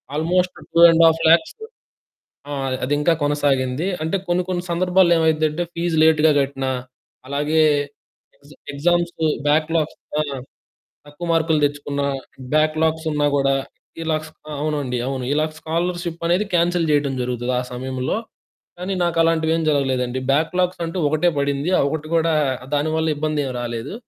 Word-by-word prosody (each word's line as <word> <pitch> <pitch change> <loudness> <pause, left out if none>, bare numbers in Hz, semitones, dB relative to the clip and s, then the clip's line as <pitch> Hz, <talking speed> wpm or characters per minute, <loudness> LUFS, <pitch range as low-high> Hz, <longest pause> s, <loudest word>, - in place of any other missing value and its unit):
Almost 180 +4 +1 0.2
2,50,000 165 - +5 1.0
ఆ! - - -3 0.3
అది 135 +3 0
ఇంకా 165 +3 +3
కొనసాగింది. 145 +1 0 0.2
అంటే 160 +5 0
కొన్ని, 175 +1 +1
కొన్ని 175 -1 -2
సందర్భాల్లో 180 0 +3
ఏమైద్దంటే, 160 +1 +1
ఫీస్ 170 -1 -1
లేట్‌గా 160 -1 +5
కట్టిన, 135 -1 -3 0.6
అలాగే 150 +3 +1 0.8
ఎగ్జ్ 145 +1 -19 0.2
ఎగ్జామ్స్ 175 +4 +1 0.3
బ్యాక్‌లాగ్స్ 155 +1 +1 0.2
ఆ! - - +3 0.9
తక్కువ 145 +4 -8
మార్కులు 160 -1 +2
తెచ్చుకున్న 145 0 -3 0.5
బ్యాక్‌లాగ్సున్నా 155 -1 +1
గూడా, 135 -1 +2 0.5
ఇలా 160 -1 0
ఫ - - -11 0.3
అవునండి. 145 -5 -2
అవును. 135 -2 -3
ఇలా 155 +1 +2
స్కాలరుషిప్పనేది 170 +3 -1
కాన్సెల్ 170 0 +2
జేయటం 145 -2 +1
జరుగుతుంది 125 0 -2
ఆ - - -1
సమయంలో. 130 +5 -3 0.6
కానీ, 185 +2 -3
నాకు 170 -1 -1
అలాంటివి 160 -1 +2
ఏమి 160 -1 -1
జరగలేదండి. 130 -3 0
బ్యాక్‌లాగ్స్ 175 +4 0
అంటూ 165 +3 -5
ఒకటే 155 +3 +2
పడింది. 140 +4 -1
ఆ - - +4
ఒకటి 155 +1 -4
గూడా 165 0 +2 0.4
దానివల్ల 155 +2 0
ఇబ్బంది 155 0 -1
ఏం 130 - -3
రాలేదు. 120 +3 -5
155 Hz, 125 wpm, -21 LUFS, 145-170 Hz, 1.0 s, 2,50,000